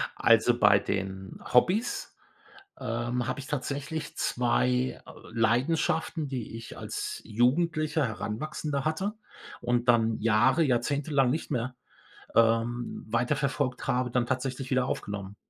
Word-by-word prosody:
Also, 115 +1 +4
bei 100 -2 +6
den 95 -1 -4
Hobbys, 190 - +2 0.6
ähm, 120 0 -2
habe 130 +2 -2
ich 135 - -8
tatsächlich 145 +3 -4
2, 125 +1 +1
äh, - - -11 0.2
Leidenschaften, 140 +7 +1
die 125 -5 -5
ich 115 - -9
als - - -4
Jugendlicher, 155 +7 +1
Heranwachsender 140 +6 -3
hatte 190 +7 -1 0.5
und 120 0 0
dann 115 -2 +3
Jahre 120 +8 +4
jahrzehntelang 140 +1 +1
nicht 155 +5 -2
mehr, 125 -1 -2 0.6
ähm, 115 +1 +1
weiterverfolgt 130 +2 0
habe, 125 0 +1
dann 120 -1 +1
tatsächlich 130 +1 -3
wieder 130 -1 +2
aufgenommen. 100 -4 -4
125 Hz, 115 wpm, -28 LUFS, 115-140 Hz, 0.6 s, bei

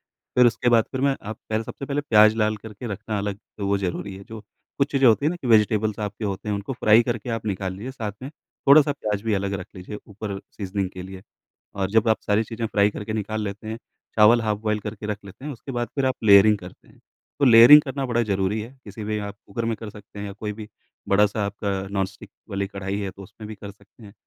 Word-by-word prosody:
फिर 125 -1 +2
उसके 120 +1 +1
बाद 115 -2 +5
फिर 130 - -2
मैं 135 0 +2
आप 110 +1 -7
पहल 110 +1 0
सबसे 135 - -7
पहले 145 +1 -1
प्याज़ 110 -5 +5
लाल 110 -1 +1
करके 110 +3 -9
रखना 105 +1 -4
अलग 100 0 -3 0.2
तो 100 - -2
वो 100 0 +1
ज़रूरी 95 +1 -4
है। 95 - -11
जो 110 -1 -9 0.4
कुछ 140 0 +1
चीज़ें 135 -2 +4
होती 115 +5 +4
हैं 155 - +3
ना 175 - -4
कि - - -5
वेजिटेबल्स 110 -1 +3
आपके 105 +1 -4
होते 100 +1 -4
हैं, 105 - 0
उनको 100 +5 -4
फ्राई 115 -2 +5
करके 120 -1 -3
आप 115 -1 -3
निकाल 95 -2 -2
लीजिए, 105 +8 -7
साथ 110 -6 -5
में 135 - -6 0.4
थोड़ा-सा 145 0 +7
प्याज़ 105 -7 -3
भी 110 - +1
अलग 100 0 -1
रख 90 - -8
लीजिए 90 +3 -7
ऊपर 100 -1 -6 0.2
सीज़निंग 100 -1 -2
के 95 -1 -8
लिए। 95 0 -10 0.5
और 95 -1 -2
जब 110 +1 +3
आप 110 - +2
सारी 105 +2 +3
चीज़ें 115 +1 -4
फ्राई 105 -1 +2
करके 105 +1 -6
निकाल 110 0 -3
लेते 100 +2 -6
हैं, 110 - -4 0.4
चावल 110 +2 +6
हाफ़ 105 -2 -1
बॉयल 105 0 -1
करके 105 0 -6
रख 105 -1 -3
लेते 100 +7 -12
हैं, 150 - -4
उसके 135 +2 -9
बाद 120 -1 -2
फिर 135 -2 0
आप 130 - +1
लेयरिंग 105 +1 +7
करते 90 -2 -13
हैं, - - -21 0.4
तो 145 - +3
लेयरिंग 120 +4 +10
करना 135 -1 -3
बड़ा 120 -1 +1
ज़रूरी 100 0 0
है। 110 +3 -7
किसी 105 +1 -8
भी 105 0 -2
आप 100 0 -6
कुकर 115 +4 -4
में 115 -1 -1
कर 110 0 -8
सकते 105 0 -13
हैं 105 - -4
या 100 - -6
कोई 105 +1 -5
भी 105 0 -9 0.4
बड़ा-सा 105 +1 +3
आपका 100 0 -3 0.2
नॉन-स्टिक 95 0 -3 0.2
वाली 100 0 -1
कढ़ाई 100 0 -4
है 100 -2 -3
तो 100 - -13
उसमें 105 +2 -11
भी 110 - -6
कर 100 0 -9
सकते 100 +3 -21
हैं। 100 -2 -12
105 Hz, 245 wpm, -24 LUFS, 100-115 Hz, 0.5 s, लेयरिंग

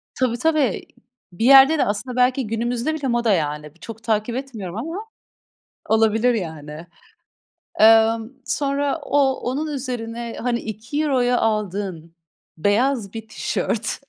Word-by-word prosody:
Tabii, 250 -2 0
tabii, 300 - +1 0.5
bir 225 +7 -2
yerde 275 +4 +8
de - - +2
aslında 215 +5 -3
belki 250 0 +2
günümüzde 235 +6 -1
bile 300 -3 -3
moda 235 -3 +1
yani. 150 -3 -2
Bi - - -26
çok 225 +4 -10
takip 220 +1 -1
etmiyorum 220 -9 -6
ama 330 - -5 0.8
olabilir 225 +2 +3
yani. 160 -5 -6 0.9
Emm, 225 +1 +5 0.2
sonra 280 +1 -1
o 275 -2 +3
onun 280 +6 -2
üzerine, 235 -3 -5
hani, 240 -1 0
€2'ya 245 +3 -1
aldığın 195 -6 -2 0.4
beyaz 210 - +1
bir 225 -1 -7
tişört 220 0 -2
230 Hz, 125 wpm, -21 LUFS, 210-265 Hz, 0.9 s, yerde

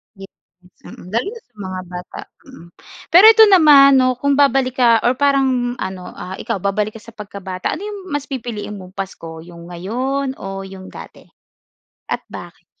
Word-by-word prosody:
Yes, 195 0 -12 0.6
mm. 180 - -12
Lalo 230 - -1
na 460 +2 -8
sa 245 - -47
mga 185 -2 -5
bata, 180 0 -8 0.3
mm. 260 -11 -14 0.4
Pero 360 +5 +8
ito 445 0 +7
naman 295 -6 +7
'no, 255 0 +2
kung 280 +3 0
babalik 270 -2 +2
ka, 235 -2 +4
or 245 - +3
parang 265 -3 +1
ano, 190 -1 -5
ah, 185 +1 -7
ikaw 230 -2 -3
babalik 210 +2 -1
ka 225 - -10
sa 230 - -13
pagkabata, 200 -3 -5
ano 370 - -8
'yong 415 -1 -6 0.2
mas 290 - -2
pipiliin 230 -6 -6
mong 185 0 -13
Pasko, 165 -4 -7
'yong 170 0 -13
ngayon 255 +10 -3
o 195 0 -6
'yong 190 -1 -11
dati, - - -12 0.9
at - - -2
bakit? - - -11
230 Hz, 175 wpm, -18 LUFS, 190-275 Hz, 0.9 s, Pero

